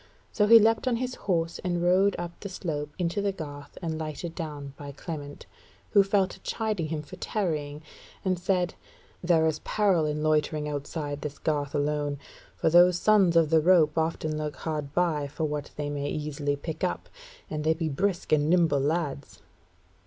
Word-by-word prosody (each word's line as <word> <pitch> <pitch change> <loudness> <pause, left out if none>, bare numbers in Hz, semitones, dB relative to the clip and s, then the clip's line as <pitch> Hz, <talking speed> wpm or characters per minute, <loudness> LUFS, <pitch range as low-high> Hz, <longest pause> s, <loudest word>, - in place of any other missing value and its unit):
So 210 -1 +2
he 230 +1 +10
leapt 225 +2 +3
on 250 - +2
his 250 +1 -2
horse 170 -6 -1
and 175 -1 -1
rode 190 +3 +4
up 175 0 -4
the 200 - -6
slope 150 -6 -4
into 180 +2 -1
the 200 0 +1
garth 145 -6 -9
and 160 -1 -2
lighted 160 +2 -5
down 145 -5 -6
by 145 0 -8
Clement; 145 -1 -7 0.5
who 200 - +7
fell 195 -1 +2
to - - -12
chiding 215 -7 -2
him 155 -1 -3
for 145 - -11
tarrying, 155 -7 -2 0.4
and 185 -2 +1
said: 180 -1 0 0.5
"There 170 -2 +4
is 155 -1 0
peril 190 -7 +2
in 150 0 -2
loitering 155 -1 +1
outside 145 0 -4
this 150 0 -5
garth 145 -2 -1
alone; 145 0 0 0.4
for 160 - +1
those 175 +1 +6
Sons 195 -3 +4
of 165 -2 +4
the 160 -1 +5
Rope 160 -3 +4
often 160 -1 -1
lurk 150 -1 -3
hard 150 -3 -4
by 155 -3 +1
for 150 +3 -5
what 150 -1 -2
they 145 -1 -3
may 145 0 -2
easily 145 -1 -2
pick 160 +4 -6
up, 180 - -1 0.4
and 150 -1 -4
they 160 +1 +2
be 165 -1 -2
brisk 185 +5 -1
and 150 0 +3
nimble 165 -5 +4
lads." 145 -1 -2
160 Hz, 180 wpm, -27 LUFS, 150-180 Hz, 0.5 s, he